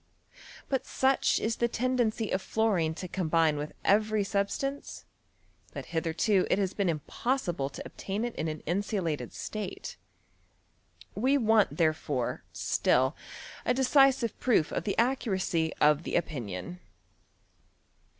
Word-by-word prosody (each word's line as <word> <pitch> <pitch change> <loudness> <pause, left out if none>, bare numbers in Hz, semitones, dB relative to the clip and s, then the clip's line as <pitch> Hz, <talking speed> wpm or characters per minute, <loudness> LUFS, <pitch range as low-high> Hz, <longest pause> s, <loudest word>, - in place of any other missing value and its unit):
But 265 -2 -1
such 265 0 +2
is 225 +1 -1
the 235 - +2
tendency 235 -2 0
of 190 - 0
fluorine 190 -9 +1
to 185 - -6
combine 165 -3 +2
with 150 +1 -5
every 215 +1 +3
sub 200 0 0
stance, 275 +1 -5 0.7
that - - -6
hitherto 170 +4 +1
it - - +3
has 195 -2 0
been 200 -3 0
impossible 170 - -1
to 135 - -9
ob - - -11
tain 200 +4 -2
it 240 - -4
in 160 - -2
an 155 -1 -4
insulated 180 -3 -2
state. 210 -3 -6 1.2
We 260 +6 +2
want 220 -4 +3
therefore, 155 -6 0
still, 130 +3 +1 0.5
a 250 - +1
decisive 265 -3 +3
proof 220 -11 +2
of - - -3
the 200 - -1
accuracy 190 -10 +1
of 150 0 +4
the - - -4
opinion. 130 - -3
195 Hz, 130 wpm, -29 LUFS, 160-230 Hz, 1.2 s, of